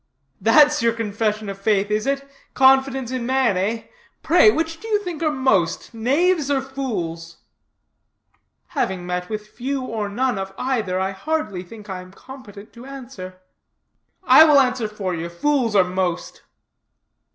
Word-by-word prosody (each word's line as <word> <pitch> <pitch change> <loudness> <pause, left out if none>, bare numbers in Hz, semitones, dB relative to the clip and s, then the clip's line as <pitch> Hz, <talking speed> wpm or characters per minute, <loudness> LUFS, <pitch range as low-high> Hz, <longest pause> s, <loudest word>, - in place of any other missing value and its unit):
"That's 295 +6 +5
your 230 0 +2
Confession 215 -1 -2
of 195 0 -6
Faith, 205 0 +1
is 215 +4 0
it? 275 0 -1 0.3
Confidence 265 -1 +3
in 255 -2 -3
man, 260 -4 +1
eh? 210 +5 -1 0.4
Pray, - - +6
which 325 -4 -1
do 445 - -9
you 430 -2 +2
think 350 -4 -6
are 315 - +2
most, 260 - 0
knaves 290 +7 +1
or 280 -1 +2
fools?" 185 -12 -5 1.3
"Having 185 -2 -2
met 180 0 -3
with 215 -1 -4
few 260 +5 -4
or 220 -4 -3
none 245 0 -1
of 195 0 -6
either, 220 -8 -1
I 190 +1 -1
hardly 210 - -3
think 210 +3 -13
I 190 -2 -5
am 185 0 -14
competent 215 -3 -13
to 240 +3 -12
answer." 235 -9 -10 0.8
"I 315 - +8
will 300 -3 +6
answer 250 -4 +1
for 205 -3 -4
you. 170 0 -4
Fools 240 +4 0
are 195 - +6
most." 180 -1 -3
225 Hz, 155 wpm, -21 LUFS, 195-270 Hz, 1.3 s, I